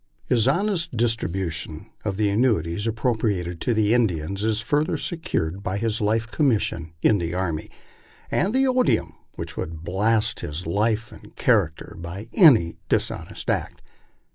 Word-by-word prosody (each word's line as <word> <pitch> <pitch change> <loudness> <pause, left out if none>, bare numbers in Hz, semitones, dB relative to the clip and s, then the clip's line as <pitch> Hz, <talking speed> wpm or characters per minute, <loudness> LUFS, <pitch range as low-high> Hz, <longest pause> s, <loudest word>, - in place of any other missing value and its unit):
His 120 -1 +2
honest 170 - 0
dis 115 0 +3
tribution 85 -5 -4
of 100 -3 -2
the 105 -1 +2
annuities 105 -4 +1
appropriated 110 -7 -1
to 120 - +1
the 110 0 +3
Indians 100 -4 0
is 110 -1 +1
further 145 +8 0
secured 100 - -2
by 95 -1 -2
his 110 +1 -1
life 110 +2 +1
commission 105 - 0
in 105 - +4
the 85 0 -3
army, 85 -4 -2 0.6
and 190 - +1
the 265 +3 +3
odium 255 -1 +2 0.2
which - - -6
would 80 0 -5
blast 105 +5 +1
his 75 +4 -5
life 110 +6 0
and - - -14
character 100 -10 +1
by 95 +6 -7
any 120 - +6
dishonest - - -2
act. - - -2
105 Hz, 145 wpm, -24 LUFS, 85-120 Hz, 0.6 s, any